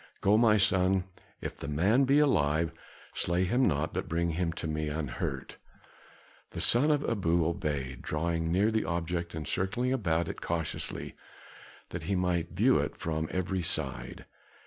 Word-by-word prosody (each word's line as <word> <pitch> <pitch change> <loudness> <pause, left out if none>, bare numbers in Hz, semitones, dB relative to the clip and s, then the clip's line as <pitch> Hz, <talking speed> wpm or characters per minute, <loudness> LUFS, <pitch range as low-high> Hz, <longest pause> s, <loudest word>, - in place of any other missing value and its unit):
"Go, 100 +2 +4
my 110 -1 +5
son; 95 -2 +3 0.4
if - - -5
the - - -7
man 100 - +3
be 135 +2 +4
alive, 80 - +3 0.4
slay 85 +1 +1
him 125 +8 +2
not, 80 -1 0
but - - -3
bring 85 +1 0
him 85 +1 -1
to 85 - -6
me 75 -1 -2
unhurt." 75 -3 -4 1.0
The - - -5
son 130 +6 +4
of 145 -1 +1
Abu 85 -7 +1
obeyed, 70 -6 -2
drawing 80 +1 -1
near 100 +5 +3
the 110 0 +1
object 85 0 -2
and 80 -1 -5
circling 120 +8 0
about 85 -9 0
it - - -6
cautiously 85 -2 -3 0.8
that 90 - -5
he 100 - +2
might 90 -2 0
view 110 +10 +3
it - - -3
from 80 -1 -2
every 95 0 -1
side. 80 -5 -3
85 Hz, 160 wpm, -30 LUFS, 80-100 Hz, 1.0 s, my